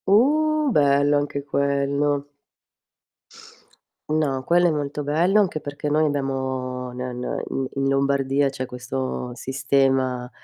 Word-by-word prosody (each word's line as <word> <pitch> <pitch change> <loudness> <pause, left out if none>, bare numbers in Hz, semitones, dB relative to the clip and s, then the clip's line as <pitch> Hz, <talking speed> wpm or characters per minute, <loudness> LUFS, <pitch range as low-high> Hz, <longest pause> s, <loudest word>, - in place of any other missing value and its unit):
Uh, 300 +8 +3
bello 145 -3 +3
anche 145 -1 -2
quello. 140 0 0 1.8
No, 145 -4 0
quello 175 +4 +3
è - - +2
molto 145 -1 -3
bello 170 +8 +2
anche 180 -7 0
perché 145 +1 -5
noi 155 +1 +3
abbiamo 130 -3 -2
n 125 - -11
n 125 -1 -4
in 135 -1 -2
in 135 0 0
Lombardia 135 0 +1
c'è 130 -1 -5
questo 125 0 -4
sistema- 130 -1 0
140 Hz, 120 wpm, -23 LUFS, 130-150 Hz, 1.8 s, Uh